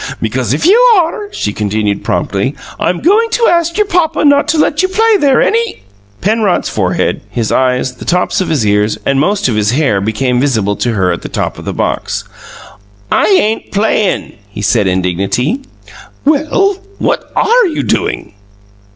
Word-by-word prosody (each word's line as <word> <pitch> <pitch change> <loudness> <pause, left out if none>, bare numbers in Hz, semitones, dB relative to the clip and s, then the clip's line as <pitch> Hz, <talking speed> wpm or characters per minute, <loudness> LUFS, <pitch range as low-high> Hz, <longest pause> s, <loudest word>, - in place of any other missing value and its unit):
"Because 120 0 -2
if 145 - 0
you 405 +7 +5 0.2
are," 365 +4 -1
she 105 - -3
continued 105 -1 -2
promptly, 100 +5 -1 0.2
"I'm 175 - -1
going 425 - +3
to 470 - +2
ask 340 0 +1
your 425 - +3
papa 345 -6 0
not 285 0 +4
to 325 - +1
let 300 +1 +2
you 375 - +2
play 440 +3 +2
there 280 -6 +3
any 460 0 -1 0.2
" 100 +1 -32
Penrod's 210 -1 +1
forehead, - - -1
his 115 -3 -2
eyes, 125 0 +1
the - - -9
tops 180 +2 0
of 185 - -2
his 140 -9 0
ears, 105 +1 +1
and 135 0 +1
most 200 +7 +1
of 120 - -1
his 105 +1 +1
hair, 130 -9 +1
became 120 +4 0
visible 110 -7 0
to 120 - -1
her 95 -4 +1
at 85 - -3
the - - -7
top - - -3
of - - -10
the - - -2
box. - - -2 0.9
"I - - +3
ain't 225 - +1
'playing!'" 205 0 0 0.2
he 100 0 -7
said 105 0 +2
indignantly. 95 - -1 0.6
"Well, 310 +7 +2 0.2
what - - -2
ARE 475 -1 +3
you 320 - -2
doing?" - - -2
150 Hz, 175 wpm, -13 LUFS, -, 0.9 s, you